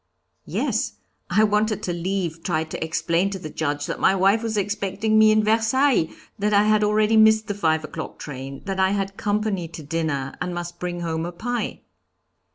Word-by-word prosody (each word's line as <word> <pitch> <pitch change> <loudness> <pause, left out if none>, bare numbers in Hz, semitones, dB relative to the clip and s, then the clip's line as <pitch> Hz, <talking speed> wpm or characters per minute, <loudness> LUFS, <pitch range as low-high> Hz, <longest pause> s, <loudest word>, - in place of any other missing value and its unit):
"Yes; - - -1 0.4
I 215 - +4
wanted 210 0 +1
to 175 - -1
leave, 175 -2 -2
tried 160 -2 -2
to - - -3
explain 165 +3 0
to 195 - -4
the 155 -4 -8
Judge 145 -2 -2
that - - -4
my 195 - +4
wife 195 +4 +3
was 225 -2 -2
expecting 205 +2 0
me 215 0 +7
in 215 0 +3
Versailles, 225 - +3 0.3
that 210 +1 +2
I 200 - +6
had 215 0 +3
already 215 +1 +3
missed 220 0 +5
the 205 - -1
five 160 -5 +1
o'clock 160 +1 -7
train, 135 -1 -7
that 195 -1 -3
I 190 +1 +3
had 195 -1 -2
company 205 -4 -1
to 160 -1 -9
dinner, 145 -3 -2
and 180 -1 -2
must 175 0 -6
bring 175 -1 -4
home 160 -1 -2
a 175 - -4
pie. 235 +6 -3
195 Hz, 190 wpm, -23 LUFS, 165-215 Hz, 0.4 s, me